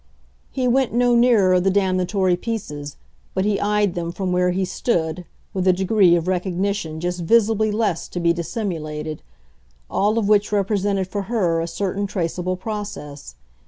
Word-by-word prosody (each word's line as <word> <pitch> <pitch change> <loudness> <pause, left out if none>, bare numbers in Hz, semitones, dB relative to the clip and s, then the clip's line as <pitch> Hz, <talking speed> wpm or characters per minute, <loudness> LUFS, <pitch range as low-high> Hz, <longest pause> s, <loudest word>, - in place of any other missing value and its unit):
He 255 -1 -1
went 255 0 +2
no 245 0 +3
nearer 215 -7 +4
the 190 +2 +2
damnatory 185 -1 +1
pieces, 150 -9 -5 0.4
but 190 +1 +1
he 205 -1 +1
eyed 205 -2 +1
them, 170 -1 -3
from 185 +1 -3
where 180 0 +2
he 185 +1 0
stood, 175 -3 -1 0.3
with 190 -2 -1
a 185 - +6
degree 190 -1 +4
of 170 0 -1
recognition 185 -2 -1
just 175 +1 -3
visibly 220 +3 +3
less 205 -6 -1
to 175 - -5
be 170 -1 +3
dissimulated; 160 -5 -4 0.7
all 210 +3 +1
of 220 -3 +1
which 210 0 +3
represented 200 -1 0
for 205 +2 -3
her 175 -8 +1
a 165 - -3
certain 200 +2 -2
traceable 180 -1 -2
process. 185 - -6
190 Hz, 160 wpm, -21 LUFS, 175-210 Hz, 0.7 s, a